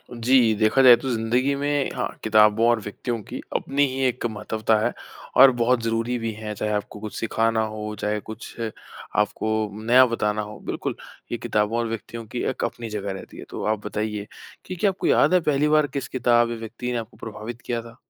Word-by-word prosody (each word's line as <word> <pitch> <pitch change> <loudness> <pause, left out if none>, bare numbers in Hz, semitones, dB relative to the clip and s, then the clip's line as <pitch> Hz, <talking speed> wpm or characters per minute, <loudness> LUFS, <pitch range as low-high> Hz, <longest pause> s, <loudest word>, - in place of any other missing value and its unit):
जी, 120 -1 +4
देखा 110 +5 +3
जाए 125 -2 +9
तो 135 +2 -4
ज़िंदगी 120 +5 +1
में 145 0 0
हाँ, - - -1 0.2
किताबों 110 +1 +5
और 120 -1 +3
व्यक्तियों 115 +3 -4
की - - -7 0.2
अपनी 140 +1 +1
ही 130 0 -4
एक 125 -1 0
महत्त्वता 110 0 0
है - - 0 0.4
और 135 +1 +9
बहुत 120 0 +2
ज़रूरी 115 +2 -1
भी 115 -1 -3
है। 105 0 -6
चाहे 105 +1 -2
आपको 105 0 -3
कुछ 110 0 -7
सिखाना 115 0 +1
हो, 105 0 -5
चाहे 105 0 -1
कुछ 110 +1 -9 0.6
आपको 110 0 -1
नया 125 +3 +6
बताना 105 -3 -1
हो 105 0 -9
बिल्कुल। - - -3 0.4
ये - - -1
किताबों 105 +2 0
और 120 - 0
व्यक्तियों 115 +1 -6
की 120 +3 -4
एक 130 - -3
अपनी 115 -1 -4
जगह 100 -2 -3
रहती 95 - -10
है। - - -8
तो - - -5
आप 110 -1 -1
बताइए 105 -1 -3 0.4
कि 185 - -5
क्या 200 +3 +2
आपको 190 - -4
याद - - +4
है 180 - +5
पहली 150 -1 +1
बार 150 -1 +4
किस 135 - -3
किताब 120 -2 +2
या 120 - -3
व्यक्ति 115 +2 -5
ने 120 - -1
आपको 115 -1 -8
प्रभावित 110 +2 -7
किया 120 -1 -3
था? 115 0 -13
115 Hz, 205 wpm, -24 LUFS, 110-125 Hz, 0.6 s, जाए